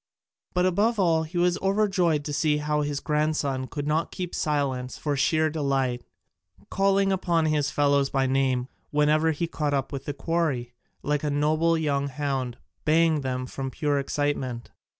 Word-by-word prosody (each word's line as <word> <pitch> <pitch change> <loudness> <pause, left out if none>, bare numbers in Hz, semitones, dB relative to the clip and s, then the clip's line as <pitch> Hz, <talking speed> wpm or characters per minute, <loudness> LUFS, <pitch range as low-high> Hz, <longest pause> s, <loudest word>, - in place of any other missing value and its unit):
But 180 0 +3
above 210 +6 +2
all 165 -4 +3
he 160 +3 -5
was 175 0 +2
overjoyed 190 -6 +1
to 150 - -3
see 150 +2 +2
how 150 0 0
his 145 -1 -2
grandson 150 -4 -1
could 145 0 -5
not 155 +2 0
keep 180 -2 -5
silence 135 -4 -1
for 145 -2 -1
sheer 155 +3 +2
delight, 135 -5 -1 0.7
calling 195 0 +2
upon 170 -4 +1
his 150 -2 +1
fellows 140 -1 +2
by 135 -1 +1
name 130 -1 +1 0.2
whenever 150 +2 +3
he 160 +2 -1
came 150 -3 -1
up 135 -1 -2
with 135 -1 -5
the 145 - -3
quarry, 140 -5 -1 0.3
like 150 0 0
a 150 - 0
noble 155 +3 +2
young 140 -3 0
hound, 135 -3 -3 0.3
baying 160 -1 +3 0.2
from 135 +1 -5
pure 145 +2 0
excitement. 140 -4 -2
150 Hz, 160 wpm, -26 LUFS, 140-165 Hz, 0.7 s, But